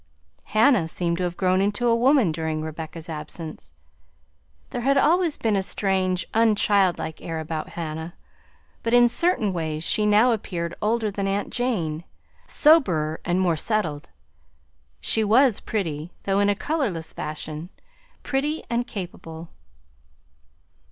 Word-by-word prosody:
Hannah 215 - +3
seemed 170 +1 -1
to 180 - -1
have 175 0 -4
grown 185 0 +2
into 205 +4 0
a 230 -1 +4
woman 250 - +4
during 155 -1 -3
Rebecca's 160 +1 -7
absence. 155 - -7 1.0
There - - -3
had 275 +3 +2
always 330 +3 +3
been 220 -2 +1
a 195 - +2
strange 190 -2 0
unchildlike 205 -7 +2
air 165 -1 -4
about 160 0 -4
Hannah, 160 +1 -5 0.7
but 230 +1 +1
in 240 0 +7
certain 235 - +1
ways 160 -2 -3
she 210 +4 +1
now 215 +4 +5
appeared 175 -6 -3
older 220 0 +1
than 200 0 -2
aunt 200 +1 -2
Jane 175 -11 -1 0.4
soberer, 180 - +3
and 175 +1 0
more 175 -3 +2
settled. 160 -5 -2 0.9
She 220 - +2
was 230 +2 +4
pretty, 165 -6 -3
though 195 0 +1
in 205 0 +3
a 205 - +2
colorless 210 - -2
fashion; 155 +2 -5 0.5
pretty 295 +3 -1
and 240 +1 0
capable. 170 -4 -7
190 Hz, 135 wpm, -24 LUFS, 160-230 Hz, 1.0 s, in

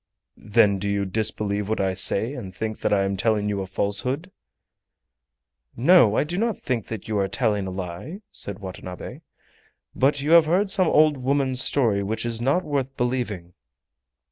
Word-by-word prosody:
"Then 105 -2 +2
do 100 +1 -2
you 100 0 0
disbelieve 105 0 -2
what 110 - -1
I 95 -1 0
say, 110 +6 +1
and 100 -10 -8
think 110 +2 -4
that - - -1
I 100 -1 +3
am 95 0 -1
telling 105 +1 0
you 100 -1 -2
a 95 - -5
falsehood?" 125 - -2 1.5
"No, 130 - +5
I - - +3
do 175 +5 -3
not 230 -1 0
think 120 -5 -3
that 110 -4 -7
you 110 -2 -1
are 100 - +1
telling 105 -2 0
a - - -3
lie," 95 - -6
said 100 -2 -5
Watanabe; 95 -2 -8 0.7
"but 140 +2 +2
you 145 +3 -1
have 170 -1 +7
heard 190 +4 +2
some 185 -3 +3
old 155 -2 +4
woman's 130 0 +1
story 115 -8 +1
which 110 +4 -2
is 115 -1 -3
not 140 +9 +1
worth 135 -3 -3
believing." 120 -8 -2
110 Hz, 175 wpm, -24 LUFS, 100-140 Hz, 1.5 s, have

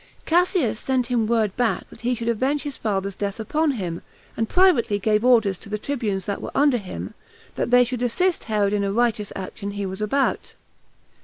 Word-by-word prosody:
Cassius 345 - +2
sent 260 -2 0
him 230 -3 +2
word 220 -4 +1
back 245 -2 0
that - - -14
he 245 +2 0
should 235 0 -5
avenge 260 +6 0
his 290 -2 -4
father's 200 -2 -2
death 200 +2 -3
upon 300 +7 0
him, 175 -7 -4 0.3
and 225 -1 -1
privately 350 - +4
gave 210 +2 +1
order 230 -6 +4
to 200 +3 -12
the 210 - -2
tribunes 210 -7 -2
that 200 - -3
were - - -5
under 280 -2 +4
him, 195 -5 -7 0.4
that - - -2
they 245 0 +6
should 245 0 -3
assist 345 +9 0
Herod 210 -2 +1
in 205 -1 +1
a 200 - 0
righteous 220 -2 0
action 195 +2 -6
he 200 0 -4
was 190 +2 -5
about. 270 +6 0
225 Hz, 200 wpm, -23 LUFS, 205-255 Hz, 0.4 s, they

